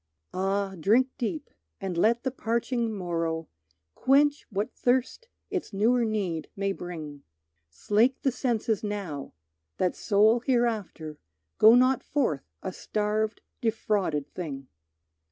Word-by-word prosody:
Ah, 195 +1 0
drink 235 +10 +4
deep 195 -10 -3 0.3
and 190 -2 -3
let 230 +7 +3
the 260 - -1
parching 235 -1 -1
morrow 165 -4 -2 0.5
Quench 290 - +3
what 205 0 -2
thirst 260 - 0 0.2
its 375 - -3
newer 235 +5 +3
need 195 -8 -2
may 195 0 0
bring! 160 -6 -7 0.5
Slake 215 - +2
the 270 - +3
senses 230 -4 -1
now, 195 -9 -4 0.4
that 180 - +1
soul 215 +3 +4
hereafter 220 - -1 0.4
Go 220 +2 +9
not 255 +1 +4
forth 240 - 0 0.2
a 190 - -4
starved 215 +2 -1 0.2
defrauded 205 - -1
thing. 140 -7 -6
210 Hz, 120 wpm, -27 LUFS, 180-235 Hz, 0.5 s, Go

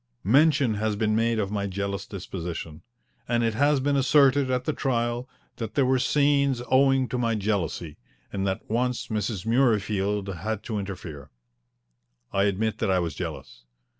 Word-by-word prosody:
Mention 140 - +4
has 105 0 -1
been 110 0 +1
made 115 +1 +1
of 100 -2 -1
my 100 -1 -1
jealous 100 0 -3
disposition, 85 -5 -6 0.5
and 120 -1 +1
it 115 -1 +1
has 145 +4 +3
been 140 +2 +1
asserted 135 0 +4
at 125 -1 -1
the 155 - 0
trial 120 -2 -1 0.3
that 115 -3 -5
there 140 - +3
were 130 0 +2
scenes 140 -1 +2
owing 135 -1 +4
to 125 +2 -3
my 115 -2 +1
jealousy, 95 -7 -2 0.4
and 100 -1 -1
that 95 0 -3
once 125 +2 -1
Mrs. 105 -3 -2
Murreyfield 105 -5 +1
had 110 +2 -3
to 110 -2 -3
interfere. 90 -8 -7 1.0
I 100 0 +3
admit 105 +2 -1
that - - 0
I 95 - +3
was 85 -4 -1
jealous. - - -7
110 Hz, 165 wpm, -26 LUFS, 100-130 Hz, 1.0 s, Mention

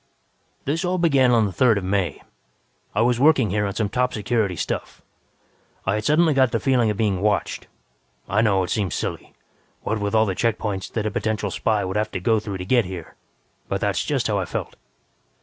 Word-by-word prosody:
"This 160 +6 -1
all 180 0 0
began 140 -7 +4
on 115 -3 +4
the 100 - -2
Third 115 +4 +3
of 100 - -3
May. 95 -1 -1 0.7
I 105 - +2
was 120 0 +2
working 135 - +4
here 105 0 0
on 100 - -5
some 110 - 0
top 125 +4 0
security 105 -3 0
stuff. - - -4 0.8
I 95 - +1
had 105 0 -2
suddenly 155 +3 +4
got 130 -3 +3
the 115 - 0
feeling 125 -4 +2
of 105 - -2
being 100 -4 0
watched. 105 0 -1 0.6
I 100 +4 +2
know 100 -4 +2
it 90 - -4
seems 100 -6 -1
silly, - - -5 0.5
what 110 - -1
with 100 +1 -1
all 110 0 +5
the 95 - -1
check 115 +4 0
points 100 -3 -3
that 110 -2 -3
a 110 - -1
potential 105 -1 -2
spy 105 0 0
would 95 +2 -2
have 105 0 0
to - - -2
go 110 +4 +2
through 105 -2 -5
to 90 - -6
get 120 +2 +3
here, 90 -3 -8 0.5
but - - -2
that's - - 0
just - - -1
how - - +1
I - - -1
felt. - - -5
110 Hz, 215 wpm, -23 LUFS, 100-120 Hz, 0.8 s, all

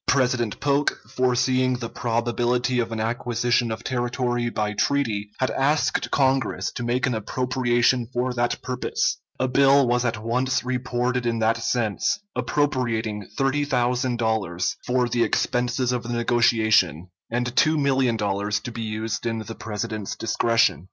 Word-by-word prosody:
President 125 -4 +1
Polk, 145 0 +1
foreseeing 130 0 +2
the 120 -1 -4
probability 120 +1 0
of 115 -1 -1
an 115 - -3
acquisition 120 +1 0
of 110 +1 -5
territory 120 -1 -1
by 105 -2 -2
treaty, 110 -4 0
had 130 - 0
asked 145 +3 +1
Congress 135 -2 +1
to - - -6
make 120 +2 0
an 125 - 0
appropriation 120 +1 +1
for 125 0 -1
that 120 0 0
purpose. 125 0 -1 0.2
A 130 - +1
bill 135 +1 +4
was 120 0 +2
at 115 -3 -2
once 125 +3 0
reported 125 -1 -1
in 115 -1 0
that 115 +1 +2
sense, 115 - 0 0.2
appropriating 120 -6 -1
$30,000 120 -8 0
for 125 0 +2
the 120 0 +1
expenses 125 +1 0
of 125 -1 -1
the 120 - -8
negotiation 115 - +2 0.2
and 120 +1 -2
$2,000,000 115 -9 +1
to 120 - -5
be 115 0 -6
used 110 +1 -3
in 115 -1 -1
the 110 +1 -6
President's 110 -1 -4
discretion. 115 +1 +2
120 Hz, 140 wpm, -24 LUFS, 115-130 Hz, 0.2 s, bill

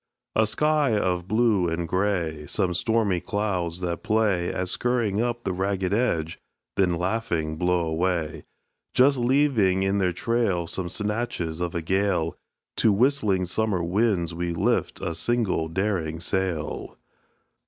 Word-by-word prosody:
A 110 0 +4
sky 150 -2 +2
of 90 -3 0
blue 110 -5 +2
and 85 +1 -2
grey; 85 -5 -1
Some 95 +1 0
stormy 100 +1 +1
clouds 90 -4 -2
that 85 -2 -2
play 105 -5 +1
At 90 - -2
scurrying 115 -4 0
up 120 0 -2
with 95 -2 -1
ragged 95 0 -1
edge, 85 -9 0 0.4
then 90 -3 +2
laughing 90 -4 -1
blow 90 +1 +1
away, 80 -1 -1 0.5
Just 135 +1 +5
leaving 120 -7 +3
in 95 +1 +1
their 90 -2 +2
trail 100 -2 0
Some 85 +1 -4
snatches 105 -6 -3
of 85 -1 -2
a 85 - -2
gale; 95 -2 0 0.4
To 110 - +4
whistling 105 -4 +2
summer 95 -1 -1
winds 90 -2 +1
we 85 0 -2
lift - - 0
a 85 - -2
single 95 -2 0
daring 80 -3 -1
sail. 90 -3 -3
95 Hz, 140 wpm, -25 LUFS, 85-110 Hz, 0.5 s, Just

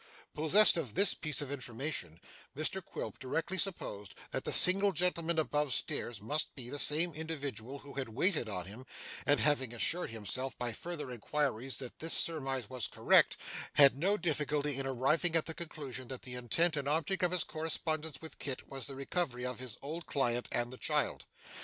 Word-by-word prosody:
Possessed 180 +7 +7
of 130 -10 -4
this 200 - +5
piece 155 -3 -1
of 140 - -7
information, 125 - -4 0.4
Mr 180 +5 +1
Quilp - - -6
directly 165 +8 -2
supposed 105 - -3 0.2
that - - -3
the - - 0
single 195 +2 +7
gentleman 170 -1 0
above 150 -3 +1
stairs 120 -4 0
must 150 +9 -2
be 125 -2 -7
the 145 - -2
same 160 +4 +4
individual 140 -5 -4
who 140 0 -12
had 135 -3 -4
waited 140 - 0
on 90 -3 -3
him, 115 +7 -11 0.4
and 145 0 +4
having 135 -5 +1
assured 170 +9 0
himself 115 +4 -3
by 120 -1 -2
further 150 -2 -5
inquiries 130 +1 -2
that 130 -3 -8
this 165 +1 +1
surmise 135 -7 0
was 125 -2 -2
correct, - - +4 0.4
had 140 -3 +7
no 190 +9 +2
difficulty 150 -5 -1
in 135 - -3
arriving 150 +7 +1
at 165 - +2
the 160 - -4
conclusion 145 -6 -7
that 130 0 -7
the 125 - -4
intent 155 +7 +1
and 140 -1 -3
object 160 +5 0
of 180 - +3
his 180 -2 0
correspondence 160 -1 -3
with 160 - -10
Kit 135 -3 -4
was 135 -3 -5
the 135 - -6
recovery 135 -2 -2
of 125 0 -4
his 125 -3 -6
old 160 +4 -6
client 120 -3 0
and 120 +1 -1
the - - -8
child. - - 0
145 Hz, 185 wpm, -33 LUFS, 125-160 Hz, 0.4 s, Possessed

